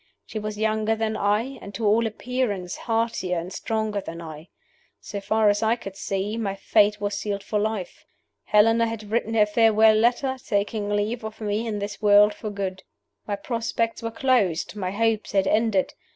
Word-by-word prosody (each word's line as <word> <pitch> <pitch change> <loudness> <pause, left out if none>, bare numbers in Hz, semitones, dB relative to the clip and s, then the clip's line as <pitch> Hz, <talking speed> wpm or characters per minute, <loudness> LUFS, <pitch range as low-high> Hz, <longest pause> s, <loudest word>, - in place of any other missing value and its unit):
He 220 - -5
was 210 0 -5
younger 220 0 +1
than 220 0 -1
I, 215 +7 0
and, 200 0 -9
to 225 - -2
all 225 +2 +3
appearance, 220 -5 -3
heartier 225 -6 -1
and 170 +3 -5
stronger 220 -2 -2
than 165 -2 -8
I. 160 -1 -9 0.5
So 200 - -6
far 220 +1 +2
as 205 +1 +3
I 225 +1 +3
could 195 -5 -9
see, 200 +2 -3
my 200 -4 -2
fate 210 +1 +3
was 205 0 -2
sealed 200 -1 -3
for 210 +1 -1
life. 215 -3 -3 0.4
Helena 225 +2 +4
had 215 -2 -6
written 225 0 0
her 210 -2 +5
farewell 220 0 +5
letter, 245 +4 +2
taking 205 0 -1
leave 210 +3 -1
of 220 0 -7
me 215 +1 -2
in 215 -2 -2
this 205 +1 -5
world 205 0 +6
for 215 +1 -6
good. 195 -2 -4 0.5
My 205 - -1
prospects 230 +2 -2
were 230 - -2
closed; 225 -9 +1
my 190 -3 -3
hopes 220 +2 0
had 195 -1 +3
ended. 215 -2 +1
210 Hz, 180 wpm, -24 LUFS, 200-225 Hz, 0.5 s, world